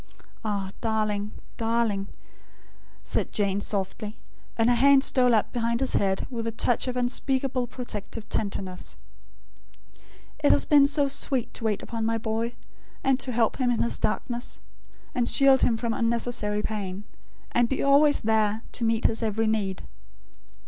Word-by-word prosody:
"Ah, 200 -3 -2
darling, 215 -2 -1 0.3
darling," 225 -3 0 1.0
said - - 0
Jane 200 -1 0
softly, 205 +2 -3 0.4
and 225 0 +3
her 245 - +4
hands 275 +2 +5
stole 250 -2 +3
up 215 - 0
behind 235 -1 0
his 265 -1 0
head, 190 -1 +1
with 230 -2 -3
a - - -1
touch 235 +2 0
of 250 0 -2
unspeakable 255 +1 0
protective 225 -3 -7
tenderness; 190 -3 -4 1.5
"it - - +6
has 95 - +4
been 285 -2 +6
so 285 0 +2
sweet 265 -2 -2
to 225 - -4
wait 210 -2 0
upon 230 -1 -4
my 225 +1 +1
boy; 225 +2 -2 0.5
and 265 -1 +2
help 240 -4 0
him 255 -2 +1
in 240 - +1
his 235 - 0
darkness; 240 +3 -2 0.5
and 240 -1 0
shield 270 -1 +5
him 230 - +2
from 230 0 -1
unnecessary 230 -3 0
pain; 200 -2 -4 0.5
and 240 -1 +2
be 270 - -1
always 285 +1 +5
there, 220 0 +1
to 240 - -5
meet 225 0 +1
his 225 - +2
every 225 0 0
need. 205 -4 -1
230 Hz, 150 wpm, -26 LUFS, 210-245 Hz, 1.5 s, it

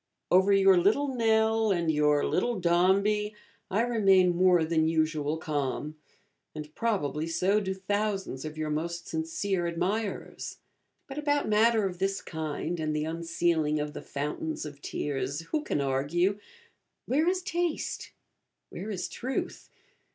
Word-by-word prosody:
Over 190 +2 +5
your 195 -1 +6
Little 220 +11 +2
Nell 220 -2 +2
and 170 -3 +1
your 150 -1 +3
Little 235 +2 0
Dombey 200 +5 +2 0.3
I 205 +4 +1
remain 195 -7 +4
more 180 -1 +4
than 160 -1 +2
usual 155 -1 0
calm; 150 -1 -3 0.6
and 150 0 -7
probably 160 - -1
so 185 +5 +2
do 190 -2 -3
thousands 195 -6 -2
of 155 0 -6
your 155 -1 -2
most 170 +3 -3
sincere 170 +3 -1
admirers. 195 +5 -3 0.5
But 275 +2 -6
about 290 -1 +1
matter 220 0 +4
of 180 -2 -4
this 195 0 0
kind, 160 +1 -4
and 155 -1 -1
the 150 0 -1
unsealing 165 -2 0
of 150 0 -3
the - - -6
fountains 150 +2 -4
of 145 -1 -9
tears, 140 +1 -3
who 305 - -2
can 225 - -1
argue? 150 +9 +1 0.7
Where 300 +6 +1
is 365 0 +1
taste? 345 -2 -2 0.6
where 210 - -6
is 190 -4 -3
truth? 260 +2 -4
175 Hz, 140 wpm, -28 LUFS, 155-210 Hz, 0.7 s, your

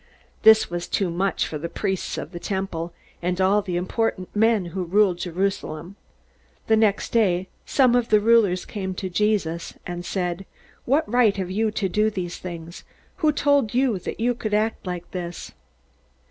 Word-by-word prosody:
This 220 0 +7
was 175 0 -4
too 190 -4 0
much 185 +3 0
for 155 - -5
the 170 +3 -4
priests 190 +1 -2
of - - -5
the 175 - -7
temple, 190 -4 -3 0.3
and 180 +1 -1
all 195 +2 +4
the 185 -3 -4
important 185 +1 -2
men 220 -2 +3
who 185 -1 -2
ruled 185 0 +2
Jerusalem. 180 -1 -3 0.7
The 220 - +4
next 215 -2 +2
day 190 -5 +2 0.2
some 255 -3 +4
of 245 -1 +2
the 215 - +5
rulers 210 -4 +3
came 190 -3 -4
to 185 0 -4
Jesus 180 -4 0
and 175 0 -5
said: 180 0 -3 0.4
"What 285 +5 +2
right 225 -2 +3
have 185 -2 -3
you 220 +3 +1
to 205 -2 0
do 210 +4 +2
these 180 -4 -5
things? 170 -1 -8 0.3
Who 310 -4 +3
told 285 -6 +2
you 250 -6 +2
that 180 - -6
you 245 +2 +2
could 215 -3 -2
act 215 -2 -1
like 175 -1 -5
this?" 175 -2 -6
195 Hz, 175 wpm, -24 LUFS, 175-220 Hz, 0.7 s, This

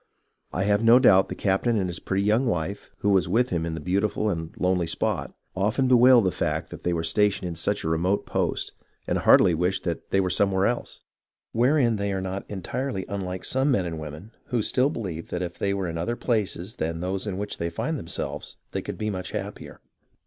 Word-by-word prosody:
I 95 - -1
have 105 +2 +2
no 115 +2 +8
doubt 95 -7 +5
the - - -4
captain 105 +4 +1
and 95 -3 0
his 85 -1 -4
pretty 95 +1 -1
young 110 +5 +2
wife, 95 -1 -2
who 105 - +2
was 95 -4 +3
with 120 +6 +2
him 85 -2 -1
in 80 - -3
the - - -5
beautiful 100 +5 0
and 80 -2 -4
lonely 90 -2 +1
spot, - - -1 0.2
often 110 +8 +1
bewailed 125 -2 +6
the 95 - +2
fact - - -2
that - - -8
they 90 - 0
were 85 -1 -1
stationed 95 +2 +1
in 85 - -4
such 100 +5 0
a - - -2
remote 85 +5 +1
post, - - -1 0.3
and - - 0
heartily 90 - +6
wished 90 +4 0
that 85 -2 -4
they 95 - +2
were 95 -1 +1
some 100 +2 +2
where 95 0 +2
else, 120 - -2 0.5
wherein 120 -1 +3
they 100 0 -1
are 95 - -1
not 95 +1 -5
entirely 105 +2 -3
unlike 95 -2 -4
some 130 +2 +1
men 100 -9 +2
and 80 -2 -4
women 75 +7 -8
who 120 -3 -1
still 130 +6 +2
believe 90 - -5
that 90 0 -2
if 85 -1 -6
they 100 - 0
were 100 -2 -1
in 85 0 -4
other 105 +8 -1
places 110 -3 -2
than 80 +1 -2
those 95 +3 -3
in 95 -2 -3
which 105 +1 -4
they 85 - -1
find 150 - -3
themselves 85 - -5 0.2
they - - -2
could - - -6
be 110 0 -2
much 95 -2 -4
happier. - - -6
95 Hz, 220 wpm, -25 LUFS, 90-110 Hz, 0.5 s, no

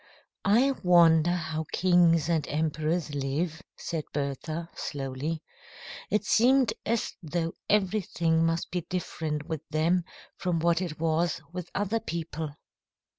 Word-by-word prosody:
"I 245 +7 +5
wonder 170 -2 +6
how 160 -2 -3
kings 170 -3 +4
and 160 -4 +1
emperors 155 +1 -1
live," 150 +5 -2 0.2
said 160 -2 -3
Bertha, 155 +4 -3
slowly. 145 +3 -4 0.7
It 210 0 +1
seemed 255 +4 +4
as 230 +1 0
though 165 0 -2 0.2
everything 180 -5 +2
must 165 0 0
be 180 0 -1
different 160 -3 -3
with 160 -4 -3
them 165 +3 +2 0.3
from 180 -2 0
what 170 +2 +2
it 165 -5 -4
was 165 +1 +1
with 180 -1 -5
other 205 +3 0
people. 160 -6 -4
165 Hz, 125 wpm, -28 LUFS, 155-180 Hz, 0.7 s, wonder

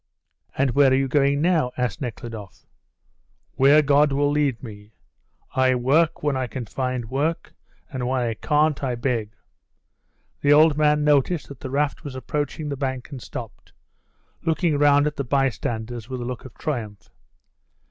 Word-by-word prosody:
"And 135 -1 +2
where 140 +1 +5
are - - +4
you 135 0 +1
going 140 +1 +2
now?" 165 -8 +2
asked 125 -6 -2
Nekhludoff. 115 -5 -7 0.9
"Where 145 +3 +5
God 145 +1 +4
will 145 +1 +1
lead 145 -5 0
me. 105 -2 -11 0.6
I 130 0 +3
work 150 +7 +2
when 145 -2 +1
I 130 -1 -1
can 120 +1 -6
find 125 +1 -3
work, 160 +5 -2 0.3
and 130 -6 -4
when 130 0 0
I 115 -2 -1
can't 150 +5 +1
I 125 -2 -1
beg." 115 -3 -2 1.0
The 145 0 +4
old 155 0 +6
man 150 0 +3
noticed 150 +2 +2
that 140 -3 -10
the 130 - -6
raft 140 0 -1
was 140 -4 -7
approaching 145 +3 -3
the 140 - -2
bank 130 -1 -4
and 135 -3 -7
stopped, - - -9 0.7
looking 160 -2 +1
round 145 0 +5
at 150 0 -2
the 140 - -1
bystanders 120 -3 -2
with 130 -1 -4
a 120 - -4
look 125 0 -6
of 130 - -12
triumph. 105 -9 -5
135 Hz, 165 wpm, -23 LUFS, 125-145 Hz, 1.0 s, old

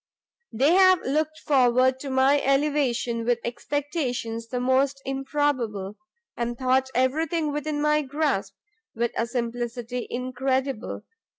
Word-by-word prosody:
They 270 +8 +3
have 370 -1 +5
looked 310 +3 -1
forward 260 -2 +3
to 275 - -6
my 265 +2 +3
elevation 270 -4 +1
with 240 0 +2
expectations 245 -3 -3
the 250 +1 -3
most 265 +2 +2
improbable, 270 -7 -1 0.4
and 240 0 -3
thought 260 +1 +2
everything 305 +5 +1
within 295 0 -2
my 300 0 +2
grasp, 295 +2 -1 0.4
with 235 +1 0
a 230 - 0
simplicity 240 0 -3
incredible. 260 0 -2
260 Hz, 115 wpm, -25 LUFS, 240-290 Hz, 0.4 s, have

